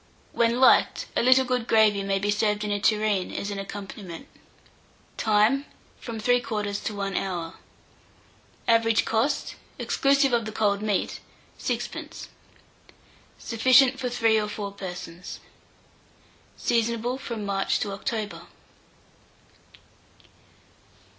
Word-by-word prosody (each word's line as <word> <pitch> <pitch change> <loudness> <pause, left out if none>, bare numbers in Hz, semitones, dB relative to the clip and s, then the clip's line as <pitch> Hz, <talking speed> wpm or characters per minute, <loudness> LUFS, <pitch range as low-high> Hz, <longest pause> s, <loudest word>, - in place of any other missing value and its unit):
When 235 +1 +1
liked, 260 - +4
a - - +2
little 260 +2 +5
good 250 -2 -1
gravy 215 -2 +4
may 195 0 0
be 205 +1 0
served 210 0 0
in 210 - -2
a 205 - 0
tureen 210 -2 +1
as 200 - -4
an 200 - -4
accompaniment. 195 +2 -8 0.9
Time. 220 +6 +2 0.3
From 230 -2 -6
3/4 215 -3 0
to 215 - -3
1 195 -1 -3
hour. 175 -4 -3 1.1
Average 230 -1 +3
cost, 230 +6 0 0.2
exclusive 275 -1 +2
of 230 -2 +2
the 220 - -5
cold 205 -1 +1
meat, 210 -2 -1 0.4
6d. - - -4 1.1
Sufficient 255 +3 +4
for 250 - -2
3 225 -2 +2
or 210 - -3
4 205 -1 -5
persons. 180 -3 -8 1.2
Seasonable 235 +2 0
from 230 -5 -5
March 195 -1 0
to 205 - -2
October. 210 +1 -4
215 Hz, 115 wpm, -26 LUFS, 200-235 Hz, 1.2 s, little